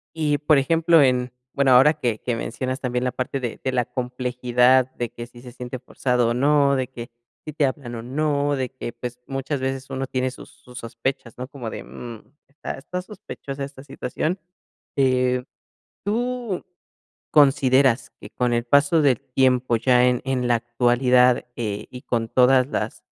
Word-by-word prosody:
Y 150 Hz, -2 st, +1 dB
por 150 Hz, -1 st, +4 dB
ejemplo 165 Hz, +3 st, +4 dB
en, 125 Hz, -2 st, +2 dB, 0.2 s
bueno, 140 Hz, -2 st, +3 dB
ahora 135 Hz, +5 st, +7 dB
que 120 Hz, -6 st, -2 dB
que 120 Hz, -2 st, -2 dB
mencionas 130 Hz, +3 st, -3 dB
también 125 Hz, -2 st, -2 dB
la 125 Hz, -, 0 dB
parte 130 Hz, +2 st, -3 dB
de 120 Hz, -3 st, -5 dB
de 130 Hz, -, 0 dB
la 125 Hz, -2 st, +1 dB
complejidad 125 Hz, 0 st, +1 dB
de 120 Hz, -1 st, -3 dB
que 120 Hz, 0 st, -8 dB
si 120 Hz, 0 st, -15 dB
se 125 Hz, -1 st, -11 dB
siente 125 Hz, +1 st, -7 dB
forzado 125 Hz, -1 st, 0 dB
o 120 Hz, -, +1 dB
no, 140 Hz, +2 st, +3 dB
de 130 Hz, -2 st, -1 dB
que 120 Hz, -1 st, -9 dB, 0.4 s
si 155 Hz, -, -6 dB
te 150 Hz, -1 st, +2 dB
hablan 130 Hz, -3 st, -4 dB
o 115 Hz, -, -5 dB
no, 145 Hz, +2 st, 0 dB
de 130 Hz, -1 st, -1 dB
que, 130 Hz, -2 st, -7 dB
pues, 120 Hz, +1 st, -7 dB
muchas 135 Hz, +1 st, -3 dB
veces 135 Hz, 0 st, -3 dB
uno 135 Hz, 0 st, -3 dB
tiene 130 Hz, 0 st, -1 dB
sus 130 Hz, -, -12 dB
sus 125 Hz, 0 st, -15 dB
sospechas, 115 Hz, +1 st, -4 dB
¿no?, 125 Hz, 0 st, -5 dB
como 130 Hz, -5 st, -7 dB
de: -, -, -7 dB
"Mm, 115 Hz, -3 st, -9 dB, 0.2 s
está 140 Hz, +2 st, -7 dB
está 180 Hz, +7 st, -5 dB
sospechosa 140 Hz, -8 st, -8 dB
esta 135 Hz, -1 st, -9 dB
situación", 150 Hz, +5 st, -3 dB, 0.6 s
eh, 125 Hz, -1 st, +2 dB, 0.6 s
¿tú 235 Hz, -1 st, -2 dB, 0.7 s
consideras 135 Hz, -3 st, +4 dB
que -, -, -11 dB
con 125 Hz, -1 st, -1 dB
el 120 Hz, 0 st, 0 dB
paso 145 Hz, +5 st, +4 dB
del 135 Hz, -2 st, +3 dB
tiempo 130 Hz, -2 st, +2 dB
ya 125 Hz, +1 st, +4 dB
en 125 Hz, -1 st, +2 dB
en 130 Hz, -2 st, -1 dB
la 120 Hz, -, +4 dB
actualidad, 125 Hz, +1 st, +3 dB
eh, 105 Hz, -3 st, -3 dB
y 125 Hz, 0 st, -9 dB
con 115 Hz, -1 st, -1 dB
todas 130 Hz, +1 st, +4 dB
las -, -, -3 dB
130 Hz, 180 wpm, -23 LUFS, 125-140 Hz, 0.7 s, ahora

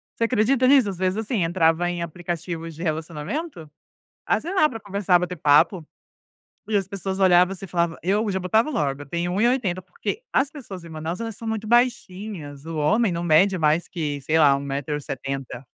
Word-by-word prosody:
você -, -, -1 dB
acredita 250 Hz, +2 st, +2 dB
nisso? 265 Hz, -3 st, +5 dB
Às 190 Hz, -, -5 dB
vezes, 185 Hz, +2 st, 0 dB
assim, 220 Hz, -3 st, -1 dB
entrava 165 Hz, 0 st, +2 dB
em 175 Hz, -1 st, -3 dB
aplicativos 170 Hz, -1 st, -5 dB
de 160 Hz, -, -11 dB
relacionamento, 160 Hz, -, -4 dB, 0.6 s
ah -, -, +2 dB
sei 345 Hz, -, -5 dB
lá, 370 Hz, -6 st, +4 dB
para 225 Hz, -6 st, -7 dB
conversar, 200 Hz, -3 st, +1 dB
bater 180 Hz, 0 st, -3 dB
papo, 155 Hz, +3 st, +3 dB, 0.8 s
e 215 Hz, -, 0 dB
as 195 Hz, -2 st, +1 dB
pessoas 195 Hz, -1 st, -4 dB
olhavam 180 Hz, 0 st, +5 dB
assim, 195 Hz, 0 st, -8 dB
eu -, -, -15 dB
falava: 170 Hz, -2 st, 0 dB
"Eu", 205 Hz, +4 st, +1 dB
já 190 Hz, -, -1 dB
botava 220 Hz, -, +2 dB
logo, 145 Hz, -, -1 dB
"eu -, -, -8 dB
tenho 170 Hz, +2 st, -2 dB
1 190 Hz, +3 st, 0 dB
e 235 Hz, -, +5 dB
80", 210 Hz, -8 st, 0 dB
porque 460 Hz, -, -5 dB
as 270 Hz, +1 st, +1 dB
pessoas 200 Hz, -, -9 dB
em 170 Hz, -, -11 dB
Manaus, 160 Hz, +3 st, -5 dB
elas 225 Hz, -2 st, -4 dB
são 225 Hz, -, -8 dB
muito 220 Hz, -1 st, -3 dB
baixinhas, 200 Hz, -, -1 dB
o 165 Hz, -1 st, -5 dB
homem 185 Hz, +9 st, +2 dB
não 170 Hz, 0 st, -3 dB
mede 180 Hz, +4 st, +4 dB
mais 155 Hz, +1 st, +2 dB
que, 150 Hz, -5 st, -4 dB
sei 155 Hz, +4 st, +1 dB
lá, 145 Hz, -3 st, +6 dB
1 -, -, -3 dB
metro 140 Hz, +1 st, -3 dB
e 150 Hz, -, -4 dB
70. 135 Hz, -1 st, -6 dB
180 Hz, 210 wpm, -23 LUFS, 160-215 Hz, 0.8 s, lá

